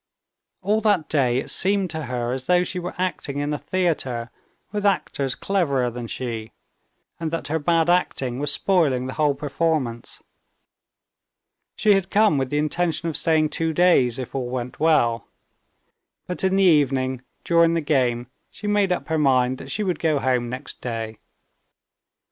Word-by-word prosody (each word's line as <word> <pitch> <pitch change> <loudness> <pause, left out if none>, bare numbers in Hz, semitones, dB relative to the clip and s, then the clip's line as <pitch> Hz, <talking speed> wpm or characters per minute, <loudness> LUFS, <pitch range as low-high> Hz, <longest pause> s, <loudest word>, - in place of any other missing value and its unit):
All 210 +3 +1
that 205 -7 +1
day 130 -5 +2
it 130 - -2
seemed 195 -2 +1
to 160 -2 -4
her 120 -1 -2
as 130 0 -4
though 180 0 +4
she 180 - -3
were 180 0 -6
acting 180 -6 -2
in 145 +1 -1
a 150 - -3
theater 135 -10 -2 0.4
with 205 0 -3
actors 140 -9 0
cleverer 140 -11 0
than 120 0 -6
she, 115 -3 -5 0.7
and 165 -1 -2
that 165 -1 -4
her 160 +2 0
bad 165 +2 +2
acting 135 -8 0
was 145 0 0
spoiling 145 -9 +2
the 130 - -5
whole 150 -2 +1
performance. 140 -4 -2 1.5
She 210 - +4
had 195 -2 0
come 210 -8 +3
with 130 -1 -2
the 145 - -1
intention 165 +2 0
of 155 - -5
staying 155 -2 +2
two 165 +1 -1
days, 150 -9 +3
if 130 -2 -6
all 130 -2 -3
went 125 -1 -5
well. 135 -8 +2 1.0
But 180 - -3
in 190 0 +2
the 195 - +3
evening, 135 -6 +2 0.2
during 170 -1 +3
the - - +2
game, 125 -5 +1 0.2
she 210 - -11
made 205 -2 +2
up 180 - -2
her 160 -1 +1
mind 130 -3 +2
that - - -9
she 210 - -2
would 185 -3 -1
go 155 -3 +1
home 125 -3 0
next 130 +3 -6
day. 115 -2 -5
150 Hz, 170 wpm, -23 LUFS, 130-175 Hz, 1.5 s, though